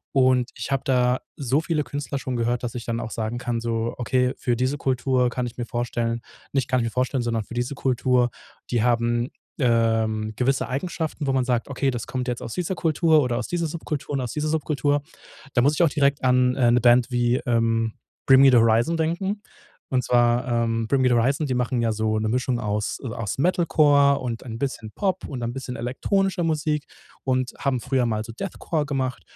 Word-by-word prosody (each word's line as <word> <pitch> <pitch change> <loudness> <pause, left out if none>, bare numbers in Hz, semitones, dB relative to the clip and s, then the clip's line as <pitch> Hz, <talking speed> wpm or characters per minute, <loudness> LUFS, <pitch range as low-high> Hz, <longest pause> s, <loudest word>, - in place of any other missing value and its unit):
Und 130 -2 +3
ich - - -6
habe 135 - 0
da 125 -1 +2 0.2
so 135 +1 +1
viele 155 -1 -1
Künstler 140 +1 -4
schon 130 -1 -4
gehört, 120 +1 0
dass 120 -1 -5
ich 120 - -5
dann 115 0 -2
auch 115 - -4
sagen 115 +1 -3
kann, 120 -1 -2
so: 115 0 -2
„Okay, 125 +1 +1
für 120 - 0
diese 130 +4 0
Kultur 130 -1 +1
kann 125 -1 -2
ich 120 - -10
mir 120 - -3
vorstellen 120 -1 -2 0.3
nicht 135 -3 0
kann 130 0 +2
ich - - 0
mir 115 - -2
vorstellen, 125 +1 0
sondern 115 -2 -1
für 120 - -10
diese 120 +3 -1
Kultur, 125 -2 +1 0.4
die 120 -3 +1
haben, 120 0 +1 0.3
ähm, 115 -3 +1
gewisse 130 +1 +1
Eigenschaften, 155 +2 -3
wo 135 - +1
man 130 -1 +1
sagt: 120 -2 0
,Okay, 140 0 -1
das 120 -3 -3
kommt 130 -1 -4
jetzt 120 -1 -3
aus 115 - -6
dieser 180 +1 -2
Kultur 160 -1 +3
oder 120 -2 -1
aus 120 - -3
dieser 175 -1 -1
Subkultur 155 -3 -4
und 135 - 0
aus 120 -3 -4
dieser 150 0 -1
Subkultur.’.“ 145 -2 0 0.5
Da 120 - +3
muss 145 +4 +3
ich 175 - +1
auch 165 - +4
direkt 140 -1 +1
an 125 0 +4
'ne 125 -2 +3
Band 120 +1 +4
wie, 120 0 +2
ähm, 115 -1 +1 0.3
„Bring 135 -1 +7
Me 135 0 +8
the 125 - +5
Horizon“ 115 +7 +3
denken. 185 +6 -1 0.5
Und 125 -2 +1
zwar, 120 0 +2
ähm, 115 -1 0
„Bring 135 +1 +2
Me 130 - +4
the 125 - +3
Horizon“, 135 +6 +1
die 135 - -2
machen 125 0 0
ja 115 -1 +1
so 110 0 0
'ne 110 0 -1
Mischung 125 +1 0
aus, 105 0 -2
äh, - - -3
aus 115 -3 -4
Metalcore 145 -3 +4
und 120 -3 -4
ein 115 -3 -7
bisschen 125 -5 -4
Pop 190 -2 -1
und 130 -4 -5
ein 120 0 -2
bisschen 125 -1 -6
elektronischer 180 - 0
Musik 155 -2 -1 0.4
und 130 -1 0
haben 135 -2 0
früher 130 -2 +1
mal 110 -2 -1
so 115 - -8
Deathcore 160 +1 -3
gemacht. 130 -3 -2
125 Hz, 215 wpm, -24 LUFS, 120-140 Hz, 0.5 s, Me